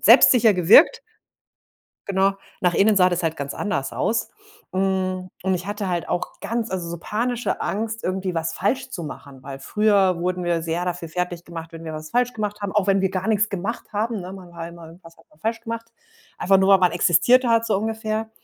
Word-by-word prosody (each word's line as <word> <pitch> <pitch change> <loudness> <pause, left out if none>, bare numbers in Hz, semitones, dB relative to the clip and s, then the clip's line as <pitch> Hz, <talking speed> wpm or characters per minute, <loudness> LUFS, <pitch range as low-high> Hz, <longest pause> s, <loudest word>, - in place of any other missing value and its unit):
selbstsicher 230 -4 +7
gewirkt. 185 - +6 1.1
Genau. 195 0 +2 0.3
Nach 180 -1 +3
innen 205 +4 +3
sah 185 -1 +5
das 175 0 -1
halt 165 -1 -1
ganz 140 0 -4
anders 140 -10 -3
aus. 230 - -1 0.4
Hm, 185 -1 -1
und 190 0 +1
ich 180 0 -4
hatte 205 -1 -3
halt 175 -1 -2
auch 175 - -3
ganz 230 0 -3
also, 180 -3 -3
so 170 - -4
panische 230 +2 -2
Angst, 220 +2 -3
irgendwie 185 0 -2
was 165 0 -2
falsch 255 +7 -1
zu 180 -10 -6
machen, 140 -3 -10
weil 135 0 -8
früher 200 +3 +2
wurden 180 +1 -2
wir 170 -1 0
sehr 165 +2 -2
dafür 175 -2 -4
fertiggemacht, 170 -1 -5
wenn 165 0 -9
wir 160 - -5
was 155 0 -7
falsch 245 0 +1
gemacht 210 -2 -4
haben, 200 -2 -3
auch 205 -2 +1
wenn 195 -1 +3
wir 190 - +1
gar 190 +2 -3
nix 215 0 +2
gemacht 200 +6 -4
haben, 215 +1 -1
ne? 180 +1 -8
Man 185 -2 -11
war 165 -1 -6
immer 170 -1 -12
irgendwas 165 0 -15
hat 165 - -22
man 150 - -26
falsch 225 +6 -2
gemacht, 230 0 -6 0.5
einfach 195 +1 +4
nur, 190 +1 +3
weil 195 - +8
man 180 -1 +3
existiert 180 +9 +4
hat, 230 -1 +3
so 215 - +1
ungefähr. 220 +1 -3
190 Hz, 210 wpm, -23 LUFS, 170-215 Hz, 1.1 s, weil